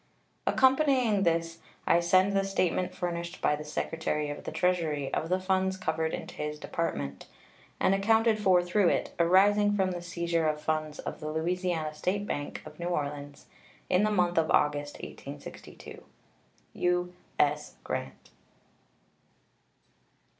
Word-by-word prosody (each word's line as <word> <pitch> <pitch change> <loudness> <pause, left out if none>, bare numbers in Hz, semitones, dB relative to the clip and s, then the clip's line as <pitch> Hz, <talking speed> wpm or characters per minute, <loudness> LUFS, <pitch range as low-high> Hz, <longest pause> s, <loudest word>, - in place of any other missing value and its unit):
Accompanying 260 -6 +3
this 165 -2 0 0.3
I 170 - +4
send 185 +3 +3
the 195 0 +2
statement 185 -1 0
furnished 170 -1 -4
by 150 - +2
the 150 - -7
Secretary 150 0 -2
of 145 - -8
the - - -4
Treasury 160 -6 0
of 160 - -1
the 185 +1 +2
funds 190 0 0
covered 160 -2 -1
into - - -6
his 150 0 -4
Department, 70 - -4 0.5
and 190 - +3
accounted 220 +2 +3
for 185 -4 +4
through 180 +2 +2
it, - - 0
arising 205 +4 +4
from 190 -2 +1
the 175 -1 -4
seizure 170 -2 -1
of 150 0 0
funds 155 -1 -2
of - - -6
the 155 - -4
Louisiana 165 -1 -1
State 185 +6 -1
Bank 145 -7 -4
of - - -12
New 170 - -3
Orleans 145 -3 -4 0.5
in 180 +1 +4
the 215 - +3
month 180 -4 +2
of 160 - 0
August, 145 0 +1
1862. 140 +1 -10 0.7
U.S. 180 -4 -1
GRANT. 65 - -5
175 Hz, 140 wpm, -29 LUFS, 155-190 Hz, 0.7 s, I